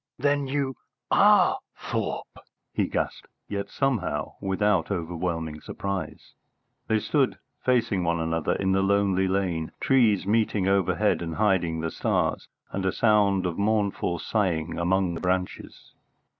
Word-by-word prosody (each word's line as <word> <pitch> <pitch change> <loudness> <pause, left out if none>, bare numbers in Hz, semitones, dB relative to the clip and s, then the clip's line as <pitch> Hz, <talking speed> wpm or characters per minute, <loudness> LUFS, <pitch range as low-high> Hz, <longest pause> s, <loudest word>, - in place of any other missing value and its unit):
"Then 145 +1 +1
you 135 -1 -2 0.3
are - - +5 0.2
Thorpe!" - - -4 0.3
he - - +1
gasped, - - -3 0.2
yet 100 -1 -4
somehow 115 - -1
without 95 -2 +1
overwhelming 80 -3 -3
surprise. 100 -1 -5 0.5
They 110 - +2
stood 135 +4 +1 0.3
facing 115 -7 +2
one 85 0 0
another 80 -1 0
in 95 -1 0
the 95 0 +3
lonely 95 -1 +2
lane, 90 -4 -1
trees 115 -8 +3
meeting 105 -2 +1
overhead 95 -3 +2
and 80 -2 -4
hiding 90 -6 +1
the 80 0 -2
stars, - - -1 0.2
and 100 - -3
a 95 - +1
sound 100 -4 +3
of 90 +1 -2
mournful 100 -4 0
sighing 85 -5 -1
among 90 +1 +1
the 85 - -6
branches. 90 0 -3
95 Hz, 130 wpm, -26 LUFS, 85-105 Hz, 0.5 s, are